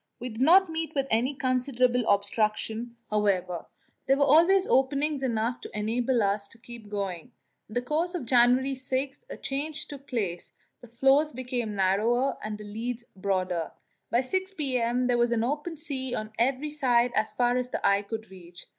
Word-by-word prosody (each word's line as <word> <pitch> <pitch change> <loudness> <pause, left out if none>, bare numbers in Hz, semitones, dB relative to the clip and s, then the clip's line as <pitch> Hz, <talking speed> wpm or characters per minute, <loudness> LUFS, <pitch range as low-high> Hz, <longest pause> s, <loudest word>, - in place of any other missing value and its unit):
We 250 - -5
did 220 +1 -7
not 370 +7 +6
meet 320 -1 -4
with 275 -1 +1
any 245 +6 +1
considerable 255 -1 +1
obstruction, 220 +3 0 0.2
however; 185 -5 0 0.4
there 270 +1 +4
were 285 - +4
always 340 +7 +5
openings 280 +1 +1
enough 235 -1 -1
to - - -8
enable 235 +3 +1
us 200 0 0
to 230 - -15
keep 230 -2 -12
going. 200 +3 -4 0.4
In 215 - -10
the 245 - 0
course 325 +7 -1
of 315 -8 -4
January 250 +2 +4
6 265 +1 -2
a - - -7
change 295 +3 -4
took 280 -1 -11
place, 195 -9 -3 0.3
the 245 - -12
floes 270 +6 +3
became 245 -4 -3
narrower 220 +8 +1
and 215 0 -4
the 210 - -10
leads 230 +3 -4
broader. 185 -3 -1 0.4
By 240 - +3
6 375 +8 -2
p.m. 250 -4 0
there 245 -1 +2
was 240 0 +2
open 290 +8 -1
sea 265 -5 -3
on 215 -1 -5
every 270 +5 +1
side 250 -5 +2
as 215 -1 0
far 245 0 +2
as 250 0 -2
the - - -3
eye 200 0 +3
could 220 +1 -7
reach. 175 -2 -12
245 Hz, 175 wpm, -27 LUFS, 215-275 Hz, 0.4 s, not